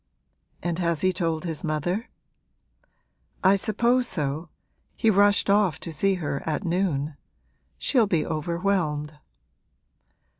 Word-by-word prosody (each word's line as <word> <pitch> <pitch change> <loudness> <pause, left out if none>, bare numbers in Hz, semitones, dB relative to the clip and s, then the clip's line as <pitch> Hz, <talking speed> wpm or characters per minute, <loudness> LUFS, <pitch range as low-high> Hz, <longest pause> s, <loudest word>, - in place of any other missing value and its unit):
'And 175 0 -1
has 170 -3 0
he 185 0 +2
told 165 -2 -1
his 165 +1 -4
mother?' 175 - -2 1.3
'I 190 +1 +6
suppose 235 +5 +1
so: 155 - -2 0.5
he 225 - +3
rushed 205 0 +4
off 200 -5 +3
to 165 - -5
see 195 +5 +2
her 145 -5 -3
at 160 +4 -2
noon. 165 -5 -1 0.6
She'll 240 -6 +2
be 170 -6 +1
overwhelmed.' 155 -2 -1
175 Hz, 115 wpm, -25 LUFS, 155-195 Hz, 1.3 s, I